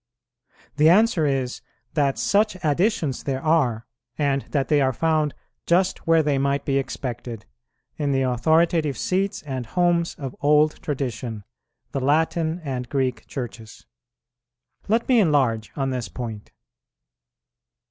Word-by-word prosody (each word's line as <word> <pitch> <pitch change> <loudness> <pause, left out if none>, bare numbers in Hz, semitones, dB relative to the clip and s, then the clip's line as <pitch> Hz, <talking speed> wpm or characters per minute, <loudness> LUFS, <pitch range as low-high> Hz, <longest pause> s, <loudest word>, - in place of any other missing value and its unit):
The 155 +2 +6
answer 185 -4 +4
is, 130 -3 -2 0.3
that 140 -3 +1
such 210 -1 +2
additions 160 - 0
there 135 -1 -2
are, 135 -9 +2 0.3
and 140 -2 +1
that 140 -3 0
they 150 -2 +3
are 130 -1 +2
found 155 +1 +1 0.3
just 180 +1 +1
where 165 -1 +5
they 145 -2 +1
might 140 0 0
be 140 -1 +1
expected, 120 -4 -5 0.5
in 145 -2 0
the 135 -1 +1
authoritative 155 +4 +2
seats 195 -2 -1
and 130 -5 -5
homes 175 +2 +1
of 135 -3 -6
old 150 +1 +3
tradition, 125 -6 -4 0.5
the 135 - -2
Latin 160 +4 +1
and 125 -4 -4
Greek 130 -4 -1
Churches. 115 -4 -8 1.0
Let 225 +3 +1
me 250 -3 +5
enlarge 135 - +2
on 135 -2 -1
this 125 -2 -3
point. 110 -4 -7
145 Hz, 130 wpm, -23 LUFS, 130-165 Hz, 1.0 s, The